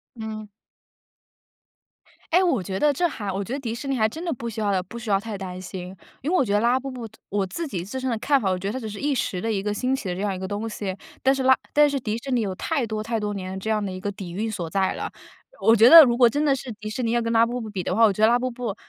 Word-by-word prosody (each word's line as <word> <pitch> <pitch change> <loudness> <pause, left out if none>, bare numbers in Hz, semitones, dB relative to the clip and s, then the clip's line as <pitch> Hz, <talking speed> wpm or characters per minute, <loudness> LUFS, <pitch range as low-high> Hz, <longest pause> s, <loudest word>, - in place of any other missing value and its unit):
嗯。 220 -2 -6 1.9
哎， 365 - +5
我 270 - +1
觉 190 +1 -4
得 300 - +4
这 345 +5 +1
还 205 -10 -5
我 195 +2 -2
觉 230 - -6
得 280 - -2
迪 230 -3 -4
士 275 +4 -7
尼 270 - 0
还 220 -2 +2
真 325 +9 -7
的 335 - 0
不 235 -1 -5
需 220 0 -6
要 200 -3 +1
不 230 +6 -10
需 225 -3 -4
要 195 - +4
太 215 -1 -6
担 185 -1 -6
心。 185 0 -7 0.3
因 310 - -1
为 - - +2
我 360 - +4
觉 210 - -3
得 205 - +3
拉 245 +2 +3
布 270 +1 -6
布 245 -3 -6 0.2
我 200 -1 0
自 330 - -5
己 185 -9 -4
自 260 +6 -5
身 260 0 -2
的 230 - 0
看 275 +4 +2
法， 195 - 0
我 185 - 0
觉 195 - -4
得 205 - -2
它 260 - -3
只 220 -3 -6
是 205 - -7
一 290 0 0
时 210 -7 -1
的 225 +4 -1
一 195 - -1
个 210 +1 -2
兴 255 +5 0
起 200 -8 -5
的 180 - -2
这 190 - -5
样 205 -2 0
一 - - -6
个 190 - -4
东 205 +3 -3
西。 200 -3 -4 0.3
但 265 +1 +4
是 265 - -2
拉 260 0 +6 0.2
但 295 0 +6
是 280 -1 -1
迪 220 -2 -2
士 265 +3 -6
尼 245 - +2
有 195 -3 -2
太 275 - -1
多 215 0 -3
太 225 0 -2
多 205 -1 -3
年 190 0 -5
这 220 - -4
样 210 -2 +1
的 190 - -4
一 185 - -6
个 205 +1 -2
底 190 -3 -8
蕴 220 +4 -2
所 180 -6 -4
在 190 +2 0
了。 - - -5 0.5
我 225 - +6
觉 230 +2 +7
得 330 +2 +12
如 240 -3 +2
果 245 -1 +7
真 290 +6 0
的 285 -3 +3
是 260 -2 -7
迪 215 0 -7
士 230 +4 -3
尼 230 - 0
要 240 0 +2
跟 230 0 -2
拉 230 0 +5
布 245 +1 -3
布 220 - -6
比 190 -4 -4
的 - - -1
话， 230 - +4
我 215 - +6
觉 210 +3 -1
得 - - +8
拉 240 +2 +4
布 255 +1 -1
布 235 -4 -4
220 Hz, 350 characters per minute, -24 LUFS, 200-255 Hz, 1.9 s, 得